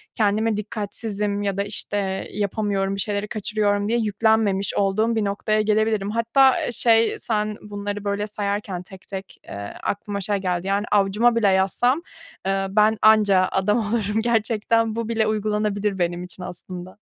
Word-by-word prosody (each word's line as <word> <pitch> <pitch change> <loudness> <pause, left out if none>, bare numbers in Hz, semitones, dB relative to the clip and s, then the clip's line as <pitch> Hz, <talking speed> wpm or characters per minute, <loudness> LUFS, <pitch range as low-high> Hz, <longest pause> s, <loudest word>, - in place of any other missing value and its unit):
kendime 215 0 +1
dikkatsizim 210 -1 -3
ya 200 -1 -1
da 200 - +1
işte, 200 -1 -3
yapamıyorum, 200 -1 -1
bir - - -6
şeyleri 205 +1 -2
kaçırıyorum 205 -1 0
diye 235 +2 +1
yüklenmemiş 210 -2 +1
olduğum 215 +4 +1
bir 220 -2 +1
noktaya 215 +2 0
gelebilirim. 215 -1 +1
Hatta, 230 +4 +3
eee, - - -2
şey 230 -1 +3
sen 210 -1 -1
bunları 205 0 -5
böyle 205 +1 -1
sayarken 200 -3 -3
tek 190 0 -14
tek, 195 -1 -8
eee, 100 0 -7
aklıma 200 0 -3
şey 205 +2 -1
geldi 180 -1 -2
yani 200 +1 0
avucuma 210 +4 +3
bile 230 -3 +3
yazsam, 195 - +2 0.4
eee, 195 0 0
ben 215 +2 +3
anca 205 -4 +5
adam 210 +3 +2
olurum 215 -1 0
gerçekten. 225 -1 +1
Bu 230 -1 -3
bile 220 -2 +1
uygulanabilir 210 -2 -1
benim 175 0 -1
için 180 0 -9
aslında. 180 +1 -8
205 Hz, 155 wpm, -23 LUFS, 195-220 Hz, 0.4 s, anca